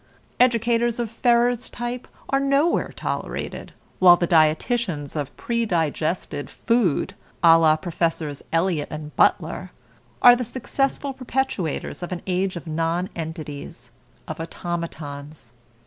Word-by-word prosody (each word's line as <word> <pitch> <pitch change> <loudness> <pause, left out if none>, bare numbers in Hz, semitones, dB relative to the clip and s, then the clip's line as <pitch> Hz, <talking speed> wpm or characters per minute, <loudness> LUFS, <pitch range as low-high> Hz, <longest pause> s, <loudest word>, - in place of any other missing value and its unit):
Educators 235 -1 +3
of 235 -2 -2
Ferrer's 240 0 +2
type 240 +1 -5 0.2
are 275 - +3
nowhere 275 +5 +2
tolerated, - - -4 0.3
while 175 -1 +8
the 175 - +1
dietitians 160 - +1
of 145 -2 -4
predigested 170 -9 -1
food, 215 -6 +1 0.3
a 165 -1 +9
la 160 -1 +5
Professors 160 -3 -2
Eliot 165 -3 +1
and 150 -1 -7
Butler, - - +2 0.5
are 245 -1 +10
the 250 - -2
successful 270 +3 -2
perpetuators 255 - -2
of 175 - -5
an 180 -1 -4
age 185 0 0
of 170 - -7
nonentities, 160 - -4 0.4
of 155 - -6
automatons. 155 -6 -6
175 Hz, 115 wpm, -23 LUFS, 155-240 Hz, 0.5 s, are